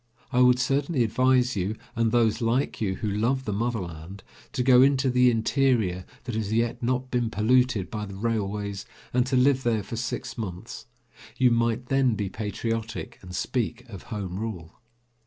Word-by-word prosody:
I 125 - +2
would 125 0 +6
certainly 135 +2 +1
advise 125 +2 +2
you 100 +2 -1 0.2
and 115 -1 +1
those 115 -1 +2
like 120 +4 0
you 95 -3 0
who 110 - -4
love 115 +6 0
the 105 - -2
motherland 95 -5 -4 0.3
to 125 - 0
go 125 -1 +6
into 135 -1 +3
the 125 0 +5
interior 115 -6 +1 0.2
that 120 -1 -5
has 110 -2 -2
yet 115 +2 0
not 125 +1 -1
been 120 -2 0
polluted 115 -3 +2
by 105 -2 -4
the 100 - -8
railways, 100 -1 -2 0.3
and 125 0 +2
to 130 - 0
live 130 +1 +4
there 115 -4 0
for 115 +4 -6
six 115 0 -4
months; 105 +2 -6 0.5
you 125 -2 +4
might 115 +1 0
then 135 -4 +3
be 100 -2 -2
patriotic 110 +2 -4
and 90 0 -9
speak 120 +2 -2
of 100 -5 -8
Home 100 -5 -4
Rule. 95 -7 -6
115 Hz, 175 wpm, -26 LUFS, 105-125 Hz, 0.5 s, would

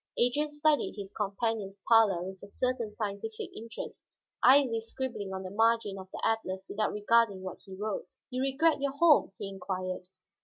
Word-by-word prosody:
Adrian 270 +5 +2
studied 295 0 +1
his 200 -1 -7
companion's 205 -1 -2
pallor 215 -6 +5
with 190 0 -7
a 200 - -10
certain 245 +1 -1
scientific 210 +1 -5
interest, 225 +1 -7 0.4
idly 255 -4 +6
scribbling 225 -4 -4
on 190 0 -4
the 185 - -6
margin 225 -2 +2
of 190 0 -10
the - - -6
atlas 190 -4 -1
without 215 +1 -1
regarding 210 -1 +3
what 185 - -6
he 190 - -9
wrote. 205 -1 -3 0.2
"You 255 +1 -1
regret 275 +3 +2
your 280 -1 0
home?" 300 -6 +5
he - - -4
inquired. 185 -1 -4
220 Hz, 165 wpm, -30 LUFS, 195-250 Hz, 0.4 s, idly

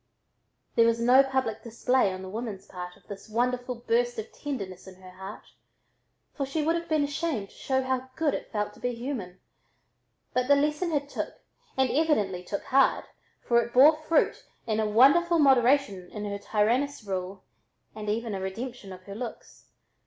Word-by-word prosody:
There 230 -1 +5
was 230 0 +2
no 250 +3 +6
public 265 -5 -1
display 235 -1 +1
on 185 0 -6
the 190 - -7
woman's 215 -2 -5
part 180 -1 -8
of - - -26
this 200 +1 -9
wonderful 245 +2 -1
burst 240 +1 0
of 220 - -6
tenderness 195 -11 -6
in 190 - -11
her 185 -1 -12
heart, 190 +3 -9 0.9
for 280 - -3
she 275 +3 -2
would 325 +2 +2
have 335 0 -4
been 310 -2 +2
ashamed 285 - -2
to - - -20
show 265 -1 0
how 260 0 -2
good 315 -3 +1
it - - -5
felt 210 -1 -2
to - - -17
be 245 -1 -2
human, 230 -8 -5 0.9
but 250 0 +1
the 285 - +6
lesson 300 +5 +1
had 290 -3 -1
"took" - - -5 0.4
and 265 -2 +3
evidently 215 - +1
"took 200 +2 -4
hard," 270 +1 +3 0.4
for 235 -1 +4
it 235 - -6
bore 290 +5 +8
fruit 310 +1 +1 0.2
in 220 -2 0
a 215 -1 +1
wonderful 285 +10 +5
moderation 265 - +3
in 210 -1 -6
her 200 0 -4
tyrannous 230 +7 0
rule 190 -1 -4 0.5
and 215 -1 -5
even 225 +1 -1
a 190 - -3
redemption 220 +2 -6
of 185 0 -10
her 200 - -9
looks. 230 +2 -8
235 Hz, 180 wpm, -27 LUFS, 200-275 Hz, 0.9 s, bore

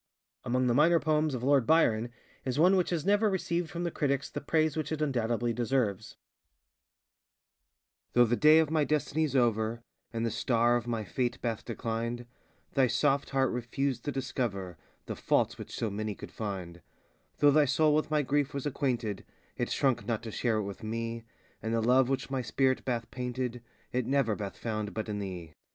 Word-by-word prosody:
Among 125 +1 +1
the 120 - +3
minor 165 +6 +5
poems 155 -2 +1
of 125 - -5
Lord 135 -3 +3
Byron 120 -8 +3 0.3
is 130 0 -2
one 180 +5 +5
which 180 -2 +2
has 165 -4 -2
never 205 +2 +3
received 175 -3 -1
from 170 +1 -4
the 170 - -1
critics 140 -2 -1
the - - -4
praise 155 +1 +1
which 155 -1 -3
it 155 - -2
undoubtedly 120 -5 0
deserves:ŌĆö 115 -4 -1 2.0
Though 120 0 +6
the 120 +1 +1
day 155 +4 +6
of 160 -1 +3
my 155 -2 +3
destinyŌĆÖs 150 0 0
over, 115 -2 +1 0.3
And 115 0 -2
the 115 - -1
star 120 +1 +2
of 120 0 -2
my 115 -2 -1
fate 120 +4 -2
bath 115 -3 -3
declined 115 +1 -3 0.5
Thy 135 -2 +4
soft 135 +4 +1
heart 135 -2 +1
refused 125 +3 -2
to 145 - -1
discover 120 -9 -3 0.3
The - - -5
faults - - +1
which - - -8
so 110 - -2
many 105 +1 -3
could - - -10
find; 95 -5 -5 0.6
Though 145 - +5
thy 150 +1 +5
soul 150 +3 +3
with 155 +1 +1
my 150 -1 +2
grief 140 +1 0
was 140 - -3
acquainted, 125 -8 -1 0.3
It - - -2
shrunk 130 -4 +1
not 115 -1 -1
to 115 - -6
share 115 0 0
it 105 - 0
with 100 0 -7
me, 115 +1 -4 0.4
And 110 +1 -1
the - - +2
love 125 +2 +4
which 135 0 -2
my 135 -1 0
spirit 130 +3 +1
bath 120 -2 -2
painted 125 -1 -3 0.3
It 125 -1 -1
never 135 -6 +2
bath 100 -2 -6
found 110 -2 -4
but 110 0 -3
in 105 -1 -2
_thee. 90 -5 -6
125 Hz, 190 wpm, -30 LUFS, 115-145 Hz, 2.0 s, Though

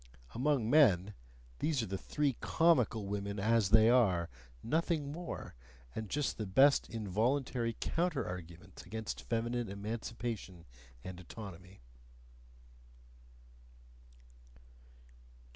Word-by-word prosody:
Among 130 -2 +1
men, 105 - +5 0.5
these 150 -6 +1
are - - -2
the 95 - -4
three 145 -4 0
comical 125 -10 +2
women 100 0 -3
as 110 -1 +3
they 110 +1 +7
are 95 -9 +3 0.3
nothing 155 +1 0
more! 170 +3 -6 0.4
and 110 -2 -5
just 145 0 -1
the 110 - -2
best 135 +9 +4
involuntary 115 +3 -1
counter 170 -4 -1
arguments 90 +1 -8
against 110 +4 -5
feminine 120 0 -2
emancipation 105 -3 -5 0.4
and 90 -1 -7
autonomy. 95 - -10
115 Hz, 95 wpm, -34 LUFS, 100-135 Hz, 0.5 s, they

